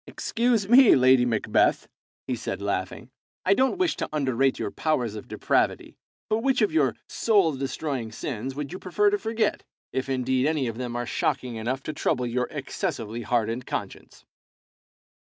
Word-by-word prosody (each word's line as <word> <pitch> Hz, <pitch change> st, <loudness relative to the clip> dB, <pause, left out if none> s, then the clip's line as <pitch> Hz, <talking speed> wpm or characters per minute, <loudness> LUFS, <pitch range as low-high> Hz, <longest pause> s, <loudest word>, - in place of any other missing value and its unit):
"Excuse 230 Hz, -4 st, 0 dB
me, 245 Hz, +2 st, +8 dB
Lady 130 Hz, -1 st, +5 dB
Macbeth," 110 Hz, -3 st, +1 dB, 0.4 s
he 125 Hz, -, -2 dB
said, 115 Hz, -3 st, -4 dB
laughing; 100 Hz, +4 st, -3 dB, 0.3 s
"I 190 Hz, -, +5 dB
don't 260 Hz, -, +2 dB
wish 365 Hz, -2 st, +1 dB
to -, -, -3 dB
underrate 135 Hz, -3 st, +1 dB
your -, -, -3 dB
powers 125 Hz, -9 st, -1 dB
of 105 Hz, -, -8 dB
depravity, -, -, 0 dB, 0.3 s
but 215 Hz, -, +1 dB
which 260 Hz, -1 st, +2 dB
of 210 Hz, -, +2 dB
your 140 Hz, -8 st, +2 dB
soul 200 Hz, -7 st, +2 dB
destroying 135 Hz, -3 st, -3 dB
sins 130 Hz, +2 st, -5 dB
would 145 Hz, +2 st, -5 dB
you 185 Hz, -, -6 dB
prefer 205 Hz, +3 st, +1 dB
to 205 Hz, -, 0 dB
forget, 220 Hz, 0 st, -1 dB, 0.3 s
if 130 Hz, +1 st, -2 dB
indeed 130 Hz, +1 st, +1 dB
any 155 Hz, -4 st, 0 dB
of 115 Hz, 0 st, -4 dB
them 120 Hz, -1 st, -4 dB
are 120 Hz, 0 st, -2 dB
shocking 130 Hz, -1 st, -1 dB
enough 125 Hz, +5 st, -3 dB
to 155 Hz, -, -4 dB
trouble 125 Hz, -3 st, 0 dB
your 125 Hz, +1 st, -1 dB
excessively 130 Hz, -, -4 dB
hardened 120 Hz, +1 st, -1 dB
conscience? -, -, -6 dB
135 Hz, 165 wpm, -26 LUFS, 120-185 Hz, 0.4 s, me